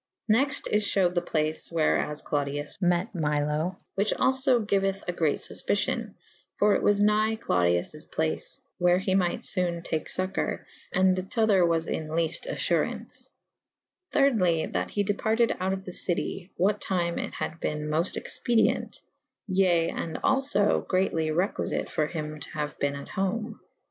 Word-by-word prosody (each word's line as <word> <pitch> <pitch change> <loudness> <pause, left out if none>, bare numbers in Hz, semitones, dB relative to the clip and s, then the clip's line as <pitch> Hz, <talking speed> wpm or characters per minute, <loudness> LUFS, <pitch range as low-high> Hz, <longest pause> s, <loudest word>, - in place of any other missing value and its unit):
Next 275 +6 +2
is 210 0 +1
fhewed 190 -3 +2
the 175 - +1
place 155 -2 -2
where 165 -2 +2
as 150 0 -4
Clodius 145 0 0
mete^ 175 0 +1
Milo 150 +2 0
/ - - -51
which 200 +2 +1
alfo 260 -3 +2
giueth 195 -1 0
a - - +1
great 160 -4 +1
fufpicion - - -1 0.2
/ - - -37
for 205 0 +4
it - - +1
was 205 0 +3
nygh 215 +1 +3
Clodiwj 90 - 0
place 160 0 -2
/ - - -53
where 175 0 +4
he 190 0 -1
myght 180 -2 +1
fone 175 -2 -1
take 160 -2 -2
focour 185 +1 -1
/ - - -25
& - - -30
the 185 0 +3
tother 205 -1 +2
was 165 -1 +1
in 155 - -3
lefte"* 165 - -1
alTurauwce. - - -2 0.8
Thyrdly 195 - +2
that - - -1
he 205 - 0
departed 220 +3 +1
out 185 +1 0
of 190 0 -4
the 180 - -7
city 175 +1 -2
/ - - -48
what 205 +3 +2
time 175 -2 -1
it - - -5
had 160 - -4
bene 150 0 -2
mofte 160 +4 0
expedi 235 -2 +2
ent - - -8 0.3
/ - - -63
ye 185 -4 +3
and 165 -1 -4
alfo 270 -5 +2
[D - - +2
vii - - +3
a] - - -6
greatly 185 -4 0
requifite 175 +5 -1
for 155 - 0
hym 155 -2 -5
to 140 - -8
haue 150 -1 -3
bene 140 0 0
at - - -10
home. 215 +4 -2
180 Hz, 180 wpm, -27 LUFS, 160-205 Hz, 0.8 s, for